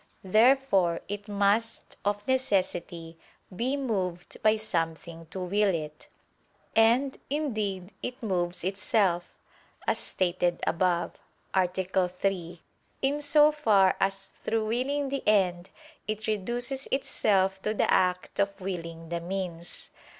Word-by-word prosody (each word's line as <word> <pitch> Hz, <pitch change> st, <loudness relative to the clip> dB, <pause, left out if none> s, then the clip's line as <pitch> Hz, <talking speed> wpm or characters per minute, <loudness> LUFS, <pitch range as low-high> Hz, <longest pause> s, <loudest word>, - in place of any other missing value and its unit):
Therefore 215 Hz, -4 st, +4 dB
it 205 Hz, +1 st, -5 dB
must, 205 Hz, +2 st, 0 dB
of 205 Hz, 0 st, -1 dB
necessity, 185 Hz, -9 st, -1 dB, 0.4 s
be 255 Hz, +7 st, 0 dB
moved 190 Hz, -10 st, -3 dB
by 215 Hz, 0 st, +4 dB
something 165 Hz, -4 st, -3 dB
to 190 Hz, -, -7 dB
will 200 Hz, +3 st, +1 dB
it. 150 Hz, -1 st, -6 dB, 0.7 s
And, 240 Hz, +5 st, +4 dB
indeed, 215 Hz, -10 st, -2 dB
it 250 Hz, 0 st, -6 dB
moves 180 Hz, -5 st, -1 dB
itself, 190 Hz, -2 st, 0 dB, 0.4 s
as -, -, +1 dB
stated 175 Hz, -1 st, 0 dB
above 175 Hz, 0 st, 0 dB, 0.3 s
(A. 185 Hz, -1 st, +4 dB
3), 180 Hz, -1 st, -2 dB, 0.4 s
in 285 Hz, +2 st, +1 dB
so 300 Hz, +1 st, +5 dB
far 210 Hz, -11 st, +4 dB
as 195 Hz, 0 st, 0 dB
through 220 Hz, -1 st, 0 dB
willing 270 Hz, +5 st, -1 dB
the 275 Hz, 0 st, -2 dB
end 185 Hz, -4 st, +2 dB, 0.4 s
it 215 Hz, 0 st, -3 dB
reduces 240 Hz, +6 st, -1 dB
itself 195 Hz, -7 st, +1 dB
to 215 Hz, +2 st, -1 dB
the -, -, +2 dB
act 180 Hz, 0 st, +1 dB
of 200 Hz, 0 st, 0 dB
willing 165 Hz, -3 st, -5 dB
the 170 Hz, 0 st, -2 dB
means. 175 Hz, -1 st, -5 dB
195 Hz, 120 wpm, -28 LUFS, 180-225 Hz, 0.7 s, so